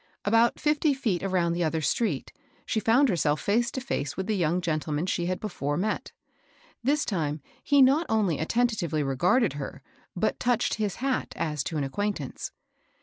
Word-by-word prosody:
About 230 +3 +3
fifty 300 -1 +2
feet 215 -10 -1
around 180 -3 +1
the 175 +1 0
other 160 0 0
street 155 - -1 0.3
she 220 - 0
found 240 +6 +4
herself 155 - +1
face 235 +4 +1
to - - -4 0.2
&ce 145 - -7
with 190 - -2
the 215 +1 0
young 175 -1 +1
gentleman 155 -2 -1
she 175 -2 -1
had 185 0 -1
before 145 -9 -3
met. 210 +4 -2 0.7
This 285 +4 +2
time 155 -6 -1 0.2
he 285 -2 +5
not 290 +6 +4
only 205 -8 +1
attentively 175 -5 0
regarded 175 - +2
her, 145 -2 -7 0.3
but - - 0
touched 245 -1 +1
his 205 -3 -1
hat 270 -2 -1
as 150 -4 -2
to 160 - -3
an 145 - 0
acquaintance. 165 -1 -3
185 Hz, 170 wpm, -27 LUFS, 155-235 Hz, 0.7 s, he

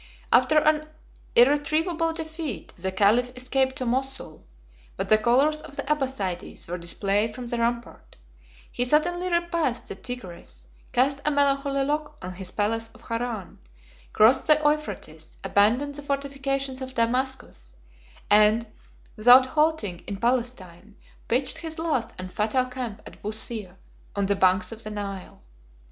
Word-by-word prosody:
After 255 +5 +5
an 305 0 +3 0.5
irretrievab 315 +5 +3
defeat, 315 - -6
the 190 +2 -3
caliph 215 +6 +3
escaped 260 +1 0
to 255 - -4
Mosul; 260 - -3 0.5
but - - -3
the 215 - +7
colors 275 +7 +3
of 275 - -10
the - - -3
Abbassides 260 -11 -3
were 175 +1 -4
displayed 200 +5 0
from 250 - -6
the 235 0 -3
rampart; 235 0 -3 0.6
he 245 - 0
suddenly 350 +7 +1
repassed 340 -7 0
the - - -4
Tigris, 175 - -7 0.3
cast 275 +3 +2
a - - +2
melancholy 275 -1 +2
look 295 +1 -2
on 185 0 -7
his 185 0 -7
palace 225 +3 -1
of 220 - -16
Haran, 230 -4 -4 0.5
crossed 225 +5 +4
the 305 -1 +6
Euphrates, 295 - -2
abandoned 240 +8 +2
the 290 - -7
fortifications 275 -1 -2
of 260 0 -6
Damascus, 235 - -2 0.5
and, 215 +2 +5 0.5
without 245 +4 +7
halting 300 - 0
in 200 - -4
Palestine, 215 -5 -2 0.3
pitched 255 +3 0
his 320 -1 -6
last 310 -8 -1
and 185 0 -8
fatal 220 +4 +1
camp 250 -5 -6
at - - -13
Busir, 215 -2 -5 0.4
on 200 -1 0
the 200 +1 +1
banks 190 +2 +2
of 225 0 -6
the 215 - -5
Nile. 200 - -7
250 Hz, 140 wpm, -25 LUFS, 210-285 Hz, 0.6 s, the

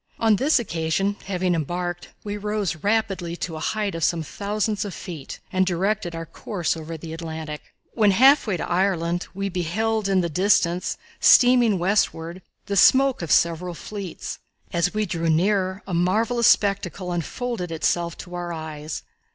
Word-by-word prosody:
On 220 -2 +3
this 280 +6 +3
occasion, 195 -1 -1
having 185 -2 0
embarked, 175 +2 -3 0.2
we 205 -1 -4
rose 210 -4 -2
rapidly 195 -3 -1
to 170 -1 -5
a - - -5
height 210 +4 -1
of 165 -1 -4
some 165 0 +1
thousands 210 +4 -2
of 200 -4 -6
feet 165 -7 -8
and 185 0 +3
directed 185 0 -1
our 165 0 -5
course 175 +1 -3
over 160 0 -6
the 160 0 -8
Atlantic. 160 -2 -6 0.3
When 215 -3 +4
half 265 +7 +5
way 195 -4 0
to - - -4
Ireland, 175 -1 0
we 195 0 -2
beheld, 195 +4 -1
in 190 -1 +3
the 170 - 0
distance, 180 +1 +1 0.2
steaming 245 -4 +6
westward, 175 -2 0 0.2
the 200 - -2
smoke 265 +5 +5
of 170 - -4
several 170 +1 +2
fleets. 200 -1 -6 0.3
As 170 +1 +1
we 215 0 0
drew 165 -3 -1
nearer 190 +3 +1
a 190 - -6
marvellous 220 +7 +2
spectacle 195 -3 +2
unfolded 180 - -3
itself 170 +1 0
to 180 - -13
our 175 -1 -4
eyes. 155 -2 -6
180 Hz, 160 wpm, -23 LUFS, 170-205 Hz, 0.3 s, steaming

